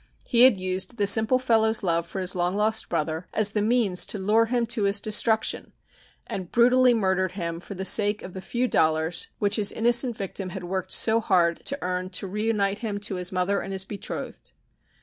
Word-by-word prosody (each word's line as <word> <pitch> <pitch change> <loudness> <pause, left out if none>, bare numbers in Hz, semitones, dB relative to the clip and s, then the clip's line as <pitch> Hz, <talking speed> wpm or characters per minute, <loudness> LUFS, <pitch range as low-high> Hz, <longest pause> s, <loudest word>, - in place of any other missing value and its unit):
He 245 0 +5
had 255 -6 +5
used 185 +5 -4
the 205 - +1
simple 220 +5 +4
fellow's 225 -3 +1
love 170 -2 0
for 190 - -5
his 185 0 0
long 180 +1 -1
lost 215 +1 0
brother 160 +1 -3
as 210 -1 +1
the 210 - -1
means 215 -4 +1
to - - 0
lure 215 +4 +2
him 240 0 0
to 225 -2 -1
his 200 +1 +3
destruction, 220 +1 0 0.5
and 185 -3 -7
brutally 250 +1 +4
murdered 190 -3 0
him 170 -3 -4
for 195 +3 -10
the 190 +1 -5
sake 205 +1 +3
of 180 - -9
the 190 - -7
few 245 +6 -2
dollars 160 -3 +2
which 205 -1 0
his 205 -2 +2
innocent 240 +1 +1
victim 195 -1 -5
had 185 0 -7
worked 185 +1 -4
so 225 0 +4
hard 175 -5 +1
to 280 - -1
earn 180 0 -3
to 190 +1 -5
reunite 205 0 -1
him 210 -3 -4
to 205 - -3
his 180 0 -3
mother 185 +2 0
and 195 - -6
his 190 0 -2
betrothed. 200 0 -8
200 Hz, 205 wpm, -24 LUFS, 185-220 Hz, 0.5 s, He